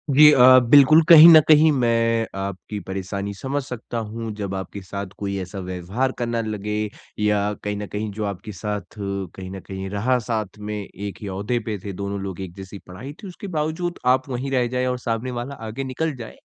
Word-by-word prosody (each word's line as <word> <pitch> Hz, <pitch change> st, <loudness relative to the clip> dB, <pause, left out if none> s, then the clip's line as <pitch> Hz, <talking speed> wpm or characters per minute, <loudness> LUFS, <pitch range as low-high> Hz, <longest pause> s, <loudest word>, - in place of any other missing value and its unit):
जी। 150 Hz, +1 st, +9 dB
अ, 130 Hz, -1 st, +8 dB
बिल्कुल 145 Hz, +3 st, +8 dB
कहीं 165 Hz, 0 st, +11 dB
न 160 Hz, -2 st, +10 dB
कहीं 155 Hz, 0 st, +6 dB
मैं 115 Hz, -3 st, +1 dB
आपकी 100 Hz, +2 st, -5 dB
परेशानी 100 Hz, +1 st, -4 dB
समझ 135 Hz, +8 st, -3 dB
सकता 125 Hz, -3 st, -6 dB
हूँ 115 Hz, -1 st, -5 dB
जब 100 Hz, -2 st, -4 dB
आपके 95 Hz, +1 st, -6 dB
साथ 100 Hz, +1 st, -6 dB
कोई 100 Hz, -1 st, -3 dB
ऐसा 95 Hz, +2 st, -6 dB
व्यवहार 95 Hz, +8 st, -2 dB
करना 120 Hz, -1 st, -1 dB
लगे 105 Hz, -1 st, -4 dB, 0.4 s
या 105 Hz, -1 st, +2 dB, 0.2 s
कहीं 105 Hz, 0 st, -2 dB
न 105 Hz, -, -4 dB
कहीं 105 Hz, +1 st, -4 dB
जो 105 Hz, +2 st, -5 dB
आपके 100 Hz, +1 st, -5 dB
साथ 105 Hz, +2 st, -4 dB, 0.2 s
कहीं 95 Hz, -2 st, -5 dB
न 95 Hz, -, -6 dB
कहीं 95 Hz, 0 st, -5 dB
रहा 115 Hz, +6 st, +1 dB
साथ 110 Hz, -3 st, -2 dB
में -, -, -2 dB
एक 100 Hz, 0 st, -7 dB
ही 100 Hz, -, -6 dB
ओहदे 105 Hz, +6 st, -2 dB
पे 105 Hz, -2 st, -2 dB
थे 100 Hz, -2 st, -5 dB
दोनों 100 Hz, +1 st, -4 dB
लोग 95 Hz, -2 st, -6 dB
एक 90 Hz, -3 st, -7 dB
जैसी 95 Hz, +1 st, -9 dB
पढ़ाई 125 Hz, +10 st, -9 dB
थी 200 Hz, -, -6 dB
उसके 185 Hz, +2 st, -9 dB
बावजूद 175 Hz, +3 st, -3 dB
आप 130 Hz, +1 st, -2 dB
वहीं 130 Hz, +2 st, -3 dB
रह 125 Hz, -2 st, +2 dB
जाए 125 Hz, +1 st, -1 dB
और 125 Hz, 0 st, -1 dB
सामने 115 Hz, +2 st, -3 dB
वाला 125 Hz, +3 st, -5 dB
आगे 130 Hz, +5 st, -5 dB
निकल 140 Hz, +3 st, -3 dB
जाए, 115 Hz, -3 st, -9 dB
110 Hz, 205 wpm, -22 LUFS, 100-130 Hz, 0.4 s, कहीं